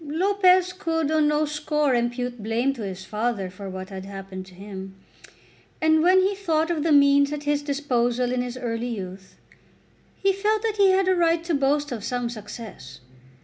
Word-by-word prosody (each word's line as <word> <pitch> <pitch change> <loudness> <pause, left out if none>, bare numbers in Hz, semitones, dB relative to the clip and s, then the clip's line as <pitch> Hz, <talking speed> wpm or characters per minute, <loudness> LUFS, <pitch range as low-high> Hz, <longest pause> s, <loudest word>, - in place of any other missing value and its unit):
Lopez 365 +2 +3
could 325 -4 -1
on 310 -1 +3
no 300 +1 +2
score 300 -1 0
impute 245 0 -1
blame 230 +5 0
to 245 - -9
his 190 -2 -6
father 210 -4 -2
for 195 +1 -8
what 185 0 -7
had 190 -1 -7
happened 195 -1 -8
to 185 - -15
him. 195 0 -9 0.8
And, 315 0 +4
when 370 +3 +5
he 390 +2 +1
thought 330 -4 0
of 320 -3 -1
the 320 +1 +1
means 280 0 +5
at 295 0 -4
his 290 0 0
disposal 250 -4 0
in 250 0 0
his 250 0 -5
early 235 -1 -3
youth, 190 -3 -7 0.8
he 390 0 +2
felt 425 +2 0
that 440 -2 -1
he 400 -1 +5
had 380 0 +3
a 375 - +4
right 335 -1 +2
to 340 0 -2
boast 285 +1 +1
of 225 -4 -5
some 245 0 -2
success. 210 - -9
280 Hz, 190 wpm, -24 LUFS, 220-325 Hz, 0.8 s, when